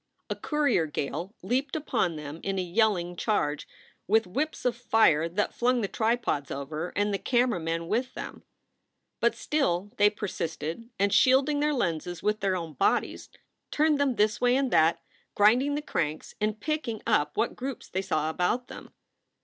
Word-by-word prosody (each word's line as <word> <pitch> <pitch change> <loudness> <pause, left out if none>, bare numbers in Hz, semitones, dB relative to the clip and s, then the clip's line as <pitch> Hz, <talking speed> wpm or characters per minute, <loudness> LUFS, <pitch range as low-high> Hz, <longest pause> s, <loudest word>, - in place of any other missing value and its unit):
A - - 0
courier 285 - +1
gale 155 +7 -4
leaped 260 - -1
upon 190 - 0
them 150 +1 -7
in 195 0 -2
a - - +1
yelling 180 -2 +1
charge, 150 -7 -1 0.4
with 220 +3 +3
whips 280 +13 -3
of 245 -2 +2
fire 220 -9 +3
that 200 +5 -1
flung 245 0 +1
the 200 - 0
tripods 220 - 0
over, 150 +5 -4
and 205 +1 +1
the 195 - -1
camera 245 -5 +1
men 165 +1 -3
with 235 +7 -1
them. - - -7 0.8
But - - +2
still 205 - 0
they 205 0 +6
persisted, 190 -1 -5
and, 200 +1 +2
shielding 265 +3 +4
their 300 +1 +2
lenses 170 - -2
with 210 0 +1
their 195 -2 +1
own 165 -3 -5
bodies, 130 - 0 0.4
turned 300 -1 +2
them 270 -3 +2
this 210 0 +1
way 245 0 +4
and 270 -2 +1
that, 160 +1 +3 0.3
grinding 245 +8 +4
the 295 - -3
cranks 155 - -3
and 215 0 0
picking 300 -8 -3
up 215 -10 +1
what 235 - 0
groups 265 0 -6
they 190 - -2
saw 155 -4 -1
about 180 +9 -1
them. - - -10
210 Hz, 170 wpm, -28 LUFS, 170-250 Hz, 0.8 s, they